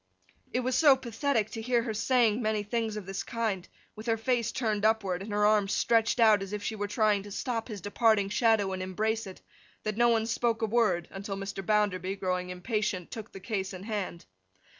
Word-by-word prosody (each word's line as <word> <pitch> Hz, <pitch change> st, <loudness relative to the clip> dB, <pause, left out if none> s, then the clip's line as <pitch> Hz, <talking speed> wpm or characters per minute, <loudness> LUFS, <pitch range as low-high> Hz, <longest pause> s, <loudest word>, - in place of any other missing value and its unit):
It 250 Hz, -, 0 dB
was 255 Hz, 0 st, 0 dB
so 290 Hz, -4 st, +7 dB
pathetic 235 Hz, -3 st, -1 dB
to 225 Hz, -, -5 dB
hear 240 Hz, 0 st, +1 dB
her 225 Hz, -2 st, -3 dB
saying 235 Hz, 0 st, +2 dB
many 215 Hz, -2 st, 0 dB
things 220 Hz, 0 st, -2 dB
of 210 Hz, -, -6 dB
this 195 Hz, +1 st, -4 dB
kind, 220 Hz, -6 st, -2 dB, 0.3 s
with 215 Hz, +2 st, -9 dB
her 225 Hz, -1 st, +2 dB
face 235 Hz, -1 st, 0 dB
turned 215 Hz, -5 st, -1 dB
upward, 205 Hz, -5 st, +1 dB
and 205 Hz, +2 st, -7 dB
her 210 Hz, 0 st, +2 dB
arms 210 Hz, -1 st, +3 dB
stretched 230 Hz, +1 st, +2 dB
out 215 Hz, -3 st, +6 dB
as 195 Hz, +1 st, -6 dB
if 210 Hz, 0 st, -4 dB
she 220 Hz, -, -2 dB
were 205 Hz, -1 st, -3 dB
trying 210 Hz, -1 st, +2 dB
to 205 Hz, +1 st, -10 dB
stop 230 Hz, +2 st, -3 dB
his 210 Hz, -5 st, -7 dB
departing 205 Hz, 0 st, +2 dB
shadow 215 Hz, -3 st, +2 dB
and 185 Hz, -, -4 dB
embrace 215 Hz, +4 st, -1 dB
it, 190 Hz, -, -10 dB, 0.4 s
that 215 Hz, -1 st, -3 dB
no 240 Hz, 0 st, +5 dB
one 225 Hz, -1 st, +2 dB
spoke 230 Hz, 0 st, 0 dB
a -, -, +4 dB
word 215 Hz, -6 st, +1 dB
until 195 Hz, 0 st, -5 dB
Mr. 195 Hz, 0 st, -5 dB
Bounderby 195 Hz, -2 st, +1 dB
(growing 180 Hz, -2 st, -2 dB
impatient) 185 Hz, -1 st, -2 dB
took 220 Hz, -2 st, -7 dB
the 195 Hz, -, -9 dB
case 195 Hz, -1 st, -3 dB
in 185 Hz, 0 st, -8 dB
hand. 200 Hz, -5 st, -4 dB
215 Hz, 210 wpm, -29 LUFS, 195-230 Hz, 0.4 s, so